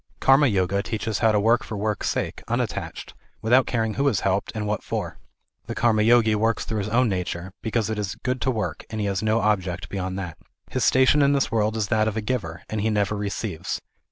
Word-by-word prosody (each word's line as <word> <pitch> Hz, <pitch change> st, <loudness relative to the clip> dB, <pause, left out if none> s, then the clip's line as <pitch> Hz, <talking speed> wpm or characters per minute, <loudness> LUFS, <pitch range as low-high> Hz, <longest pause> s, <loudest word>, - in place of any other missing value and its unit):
Karma 135 Hz, +2 st, +5 dB
Yoga 100 Hz, -2 st, +1 dB
teaches 110 Hz, 0 st, -3 dB
how 110 Hz, -, +4 dB
to 105 Hz, -, +3 dB
work 115 Hz, +5 st, +3 dB
for 110 Hz, -, -6 dB
work's 105 Hz, +1 st, -1 dB
sake, -, -, -2 dB
unattached, -, -, -3 dB, 0.3 s
without 125 Hz, +4 st, +3 dB
caring 110 Hz, -3 st, 0 dB
who 140 Hz, +4 st, +1 dB
is 120 Hz, -8 st, +1 dB
helped, 100 Hz, +1 st, 0 dB
and 105 Hz, -1 st, -2 dB
what 105 Hz, 0 st, -1 dB
for. -, -, -4 dB, 0.5 s
The -, -, -4 dB
Karma 110 Hz, -2 st, +3 dB
Yogi 115 Hz, 0 st, +5 dB
works 110 Hz, +1 st, +1 dB
through 110 Hz, -, -2 dB
his 100 Hz, +1 st, -3 dB
own 125 Hz, +3 st, +3 dB
nature, 90 Hz, -2 st, -3 dB
because 110 Hz, -1 st, 0 dB
it 110 Hz, -1 st, -2 dB
is 100 Hz, -3 st, -3 dB
good 125 Hz, -1 st, -1 dB
to 130 Hz, -, +1 dB
work, 110 Hz, -4 st, -2 dB
and 110 Hz, -1 st, -4 dB
has 100 Hz, -2 st, -1 dB
no 110 Hz, +1 st, +2 dB
object 95 Hz, -4 st, 0 dB
beyond 95 Hz, -1 st, -3 dB
that. 90 Hz, -4 st, -6 dB, 0.3 s
His -, -, 0 dB
station 130 Hz, +3 st, +5 dB
in 140 Hz, 0 st, +4 dB
this 140 Hz, -1 st, +1 dB
world 110 Hz, 0 st, +1 dB
is 105 Hz, -3 st, -1 dB
that 110 Hz, -2 st, +2 dB
of 110 Hz, 0 st, -2 dB
a -, -, 0 dB
giver, 105 Hz, -8 st, -3 dB
and 110 Hz, -1 st, -3 dB
he 110 Hz, -, +1 dB
never 105 Hz, -1 st, +1 dB
receives. 100 Hz, -2 st, -3 dB
110 Hz, 220 wpm, -24 LUFS, 100-115 Hz, 0.5 s, Karma